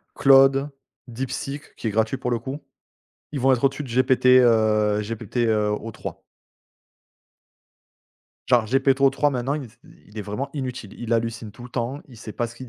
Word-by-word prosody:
Claude, 135 +1 +5 0.4
Deepseek, 135 +4 -6
qui 115 - -4
est - - 0
gratuit 110 +5 0
pour 125 -2 -3
le 120 - 0
coup, 135 +5 -6 0.7
ils 140 - -3
vont 135 +1 +4
être 125 +1 0
au-dessus 135 +2 +1
de 135 - -8
GPT, 130 +1 +2 0.2
heu, 105 -2 +3
GPT, 115 +3 -6
heu, 105 -1 +1
O3. 110 +1 -6 2.3
Genre 125 -3 +4
GPTO3 135 +3 +2
maintenant, 130 +2 -2
il 150 - -4
s 115 -1 -16 0.3
il 105 - -18
est - - -3
vraiment 105 +7 -4
inutile, 125 -7 -5
il 120 -1 -3
hallucine 115 -1 -1
tout 120 +3 -13
le 125 - -9
temps, 125 +3 -3
il 120 - -14
sait 110 -1 -9
pas 120 - -2
ce 115 - -12
qu'il 130 0 -10
120 Hz, 175 wpm, -23 LUFS, 110-135 Hz, 2.3 s, Claude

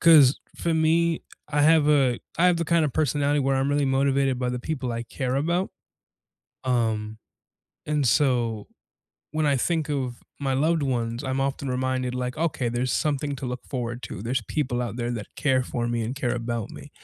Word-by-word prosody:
'Cause 150 -5 +7 0.2
for 170 -1 0
me, 165 +1 +2 0.3
I 145 -1 +1
have 155 -1 +5
a 135 -5 +4 0.2
I 175 - +4
have 180 -1 +4
the 170 - -1
kind 170 0 +3
of 145 - -1
personality 145 0 +1
where 135 -1 +2
I'm 135 +1 +1
really 145 0 +2
motivated 135 0 +2
by 125 -1 -1
the 125 0 -2
people 130 -1 -3
I 115 0 -3
care 130 +2 -2
about. 170 +6 0 1.0
Um, 110 -3 0 0.7
and 150 -3 +1
so 120 -4 +2 0.7
when 155 0 0
I 145 -2 +3
think 160 +3 0
of 130 -4 -3 0.2
my 135 -2 -1
loved 155 +3 +2
ones, 120 -1 -1
I'm 130 0 -1
often 135 0 -1
reminded, 130 0 -1
like, 125 0 -3
okay, 150 -6 0
there's 120 +1 -1
something 145 -1 0
to 130 - -5
look 125 0 -5
forward 120 -2 -4
to. 100 - -7
There's 120 +2 -1
people 125 0 -1
out 120 -2 -4
there 120 -1 -2
that 115 -4 -6
care 130 -3 +2
for 120 -1 -2
me 120 -1 -1
and 115 +4 -3
care 130 -3 -1
about 115 -2 -3
me. - - -11
135 Hz, 195 wpm, -25 LUFS, 120-150 Hz, 1.0 s, Cause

